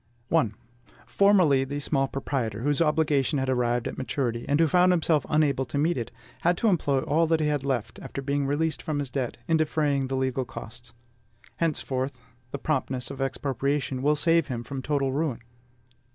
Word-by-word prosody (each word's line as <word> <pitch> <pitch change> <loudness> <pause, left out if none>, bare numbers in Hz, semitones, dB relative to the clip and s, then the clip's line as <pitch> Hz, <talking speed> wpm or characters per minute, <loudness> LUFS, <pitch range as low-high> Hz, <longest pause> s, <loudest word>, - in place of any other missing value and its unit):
I. 155 -9 +4 0.6
Formerly, 180 -10 +4
the 140 +2 -4
small 135 -1 0
proprietor 125 -6 -3
whose 145 +2 +1
obligation 150 -2 +2
had 130 -1 -1
arrived 120 -2 +1
at - - -6
maturity, 120 -3 -2
and 145 +2 +3
who 165 - +6
found 180 +3 +4
himself 160 -3 +2
unable 145 -4 +2
to 140 - -4
meet 160 +4 +2
it, 120 -3 -3 0.3
had 175 +1 +2
to 225 - +2
employ 145 -7 +1
all 160 +4 +2
that 165 0 +2
he 155 - +1
had 145 -2 0
left, 120 -5 -2
after - - -7
being 140 0 -1
released 155 +3 0
from 155 -2 -3
his 140 -3 -3
debt, 130 -4 -2
in 165 - +3
defraying 150 -3 +1
the 135 0 -2
legal 130 0 0
costs. 120 -1 -10 0.6
Henceforth, 135 -5 -1 0.3
the 140 - -4
promptness 130 -3 -2
of 135 -1 -6
expropriation 135 0 -1
will 150 +2 +3
save 165 +3 +2
him 120 -3 -4
from 135 +1 -5
total 140 -1 0
ruin. 140 -5 -1
140 Hz, 180 wpm, -26 LUFS, 130-155 Hz, 0.6 s, who